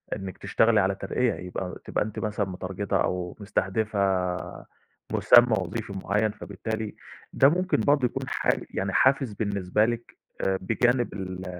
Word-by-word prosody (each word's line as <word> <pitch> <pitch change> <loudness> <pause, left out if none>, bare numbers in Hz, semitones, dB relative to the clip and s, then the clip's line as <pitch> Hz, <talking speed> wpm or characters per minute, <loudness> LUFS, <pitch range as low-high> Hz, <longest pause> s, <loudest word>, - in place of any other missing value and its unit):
إنك 95 -3 -7
تشتغلي 115 -1 +3
على 95 +1 +1
ترقية، 115 +5 0
يبقى 90 0 -5
تبقى - - 0
أنتِ 105 0 -6
مثلًا 105 -2 -2
مترجتة 95 +2 -2
أو 90 -1 -2
مستهدفة 105 +1 -1 1.1
مُسمى 120 -2 +6
وظيفي 100 +3 -4
معين 105 +1 +1
فبالتالي 110 +1 -5 0.4
ده 135 - +6
ممكن 180 +3 +1
برضه 145 -3 +3
يكون - - -2
حا - - -1 0.2
يعني 95 0 -2
حافز 130 -3 +3
بالنسبة 100 -1 0
لكِ 120 0 -4 0.2
آآ 95 0 +1
بجانب 120 +5 +1
ال 95 -1 -6
105 Hz, 140 wpm, -26 LUFS, 95-115 Hz, 1.1 s, مُسمى